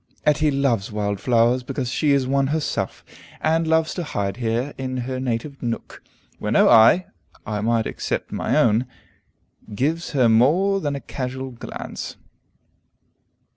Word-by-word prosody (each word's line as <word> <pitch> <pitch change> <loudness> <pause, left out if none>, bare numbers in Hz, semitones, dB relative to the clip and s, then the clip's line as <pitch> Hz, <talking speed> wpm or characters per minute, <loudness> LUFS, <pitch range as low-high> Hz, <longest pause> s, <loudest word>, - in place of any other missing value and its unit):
Etty 150 0 +3
loves 135 -8 0
wild 100 -1 -2
flowers 120 +2 +3
because 125 0 -4
she 145 +3 +1
is 140 -2 +3
one 135 +1 +1
herself, 155 +1 -2 0.3
and 160 +1 +1
loves 160 0 +2
to 175 - -3
hide 100 -9 -3
here 120 +3 -1
in 130 -1 -4
her 130 0 -3
native 130 +3 -3
nook, 115 -2 -5 0.4
where - - -3
no - - +5
eye 115 +11 +6 0.4
(I 105 -1 -3
might 115 0 +1
except - - -3
my - - 0
own) 115 +2 +3 0.9
gives 160 +8 -1
her 130 -4 +4
more 165 - +3
than 145 -3 -2
a 140 - -5
casual 130 0 -5
glance. 120 - -7
130 Hz, 145 wpm, -22 LUFS, 115-150 Hz, 0.9 s, eye